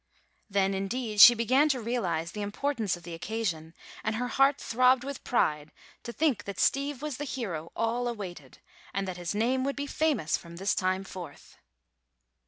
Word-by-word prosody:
Then, 195 -1 +1
indeed, 210 +2 0
she 240 - +11
began 255 +6 +3
to 265 -3 +1
realize 190 -8 -2
the 210 - -6
importance 215 -2 -1
of 175 - -16
the 170 0 -8
occasion, 165 -4 -3 0.3
and 220 0 -1
her 245 +2 -2
heart 275 +3 +3
throbbed 250 +2 +3
with 280 0 -6
pride 150 -10 0 0.3
to 235 - -7
think 285 -4 0
that 200 -2 -6
Steve 280 0 +1
was 300 -4 -3
the 290 - -4
hero 195 - -4
all 235 +2 0
awaited 180 - -7 0.4
and 195 0 -1
that 185 -1 -5
his 175 +2 -4
name 250 +5 +1
would 275 +1 -1
be 285 - -3
famous 290 - 0
from 170 0 -12
this 195 +3 0
time 185 0 0
forth. 185 -2 -10
220 Hz, 180 wpm, -29 LUFS, 185-255 Hz, 0.4 s, she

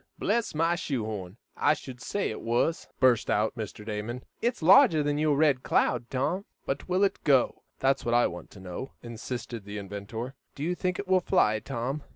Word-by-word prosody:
"Bless 220 -3 0
my 165 +2 +3
shoe 135 -9 -2
horn! 100 -2 -6 0.2
I 150 - +3
should 130 -4 -10
say 200 - -1
it 110 - -6
was!" 120 +8 0
burst 130 -4 +4
out 110 +3 +1
Mr. 105 -2 -6
Damon. 110 +3 -4 0.2
"It's 235 -6 -1
larger 160 -3 +7
than 145 0 0
your 150 -2 +2
RED 145 -4 +3
CLOUD, 120 - +1
Tom." 160 +9 -1 0.2
"But 135 +6 -3
will 185 +2 +3
it 200 - 0
go? 135 -5 +3 0.2
That's 135 +1 +1
what 120 0 +1
I 120 - +5
want 90 - -5
to 100 - -14
know," 95 +8 -7
insisted 120 -1 -6
the 105 +1 -7
inventor. 105 +5 -6 0.2
"Do 140 - -5
you 175 +3 +1
think 180 0 -1
it 200 - -5
will 185 0 +4
fly, 110 - +3
Tom? 130 +5 -3
130 Hz, 200 wpm, -28 LUFS, 110-160 Hz, 0.2 s, larger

